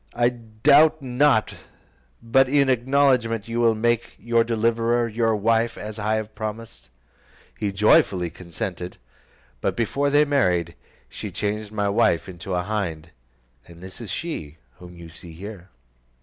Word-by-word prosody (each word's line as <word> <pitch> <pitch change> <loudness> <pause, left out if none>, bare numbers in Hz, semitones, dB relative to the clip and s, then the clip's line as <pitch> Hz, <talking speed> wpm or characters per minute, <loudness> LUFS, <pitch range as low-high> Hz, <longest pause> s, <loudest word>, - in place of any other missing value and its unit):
I 120 0 +3
doubt 135 +7 +3
not 125 -2 +2 0.7
but 130 +3 +3
in 140 -1 +3
acknowledgment 125 -3 +2
you 115 +1 -2
will 115 -1 +3
make 120 +1 0
your 115 0 +2
deliverer 115 +1 +1
your 115 0 +1
wife, 115 +2 +1
as 105 +1 -7
I 105 +1 0
have 110 0 -4
promised." 110 - -7 0.7
He 105 - -2
joyfully 95 -3 +3
consented; 90 +1 -6 0.6
but - - -1
before 140 +5 0
they 145 +1 +4
married, 90 - +1 0.3
she - - -7
changed 105 0 -3
my 105 -1 -1
wife 100 -3 +2
into 90 0 -5
a 90 - 0
hind; 85 -6 -4 0.6
and 85 +1 -14
this 95 +5 -10
is 110 - -7
she 90 - -5 0.2
whom 90 -1 -12
you 85 -1 -10
see 85 +1 -10
here. 95 +1 -10
110 Hz, 145 wpm, -23 LUFS, 95-120 Hz, 0.7 s, they